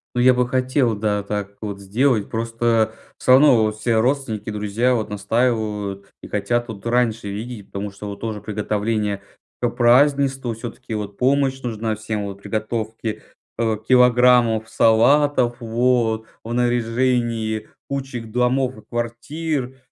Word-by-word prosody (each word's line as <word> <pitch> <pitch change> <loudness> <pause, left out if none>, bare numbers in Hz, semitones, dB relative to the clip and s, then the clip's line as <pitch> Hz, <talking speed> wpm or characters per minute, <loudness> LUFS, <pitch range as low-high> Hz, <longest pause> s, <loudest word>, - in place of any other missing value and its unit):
Ну 125 - +2
я 130 +1 +6
бы 125 0 +1
хотел, 130 -2 +1
да, 105 0 0
так 100 -1 -4
вот 100 -2 -5
сделать. 110 +3 +1
Просто 115 -1 0 0.2
всё 130 - +4
равно, 130 -4 +6
вот, 110 0 0
все 115 0 +1
родственники, 120 -4 -1
друзья, 105 +4 0
вот, 110 -2 -2
настаивают 105 -2 -1
и - - -9
хотят, 120 +4 -1
вот, 100 -2 -8
раньше 115 -3 0
видеть, 105 +1 -6
потому 100 +1 -5
что, 100 +1 -9
вот, 100 0 -7
тоже 110 -2 -4
приготовления 105 0 -2 0.4
к 120 - +2
празднеству 130 +1 +3
всё-таки, 115 +1 -8
вот, 105 -1 -5
помощь 135 0 +1
нужна 110 -2 -2
всем, 110 -1 -4
вот, 100 0 -7
при - - -10
готовке, 110 0 -3 0.4
э, 110 -2 +1
килограммов 125 -3 +4
салатов, 125 +2 +3
вот, 115 -1 +1 0.2
в 115 - -5
наряжении 120 -2 0 0.2
кучи 135 -2 -3
домов 125 +3 0
и 110 - -12
квартир. 125 +4 -4
115 Hz, 140 wpm, -21 LUFS, 105-125 Hz, 0.4 s, я